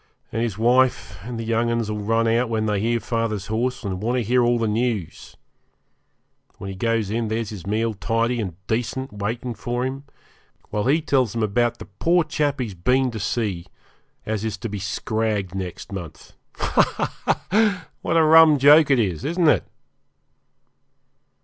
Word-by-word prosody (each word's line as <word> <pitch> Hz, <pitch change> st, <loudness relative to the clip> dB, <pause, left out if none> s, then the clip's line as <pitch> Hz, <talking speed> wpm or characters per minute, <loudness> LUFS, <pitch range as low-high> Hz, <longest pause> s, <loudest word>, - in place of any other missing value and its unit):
And 115 Hz, -, -2 dB
his 115 Hz, -5 st, -2 dB
wife 120 Hz, -4 st, +2 dB
and 120 Hz, +1 st, -6 dB
the -, -, -3 dB
young 115 Hz, +1 st, 0 dB
'uns 115 Hz, -2 st, 0 dB
'll 105 Hz, 0 st, -3 dB
run 115 Hz, +2 st, +1 dB
out 115 Hz, +2 st, +2 dB
when 110 Hz, -1 st, 0 dB
they 105 Hz, -2 st, 0 dB
hear 115 Hz, +3 st, +1 dB
father's 115 Hz, -3 st, -2 dB
horse, 120 Hz, +4 st, -2 dB
and 95 Hz, -3 st, -4 dB
want 120 Hz, +4 st, 0 dB
to 125 Hz, -, 0 dB
hear 125 Hz, +3 st, +2 dB
all 120 Hz, 0 st, +3 dB
the 115 Hz, -1 st, 0 dB
news. 110 Hz, -4 st, -2 dB, 1.2 s
When 95 Hz, -, -6 dB
he -, -, -7 dB
goes 115 Hz, 0 st, 0 dB
in 115 Hz, 0 st, -1 dB
there's 110 Hz, 0 st, -2 dB
his 95 Hz, -4 st, -8 dB
meal 110 Hz, +2 st, 0 dB
tidy 115 Hz, +3 st, 0 dB
and 95 Hz, -6 st, -5 dB
decent 120 Hz, +4 st, -2 dB
waiting 115 Hz, +4 st, -3 dB
for 120 Hz, +2 st, -3 dB
him, 135 Hz, +2 st, -5 dB, 0.7 s
while 105 Hz, -1 st, -1 dB
he 150 Hz, +5 st, +2 dB
tells 130 Hz, -8 st, +1 dB
them 115 Hz, -1 st, -1 dB
about 120 Hz, +3 st, +1 dB
the -, -, -9 dB
poor 170 Hz, -, +1 dB
chap 150 Hz, -2 st, -1 dB
he's 115 Hz, -6 st, -3 dB
been 125 Hz, +8 st, +1 dB
to 110 Hz, -, -6 dB
see 100 Hz, -5 st, -2 dB, 0.6 s
as 110 Hz, -1 st, -2 dB
is 110 Hz, -2 st, -3 dB
to 115 Hz, +3 st, -5 dB
be 105 Hz, 0 st, -5 dB
scragged 105 Hz, 0 st, -2 dB
next 95 Hz, -1 st, -6 dB
month. 90 Hz, -5 st, -8 dB, 0.2 s
Ha! -, -, 0 dB
ha! 200 Hz, -3 st, +1 dB
what 165 Hz, -, 0 dB
a 165 Hz, -, +5 dB
rum 160 Hz, -1 st, +7 dB
joke 145 Hz, +3 st, +6 dB
it 135 Hz, -, +4 dB
is, 95 Hz, -9 st, -1 dB
isn't 170 Hz, +2 st, +1 dB
it? -, -, +3 dB
115 Hz, 180 wpm, -23 LUFS, 105-125 Hz, 1.2 s, rum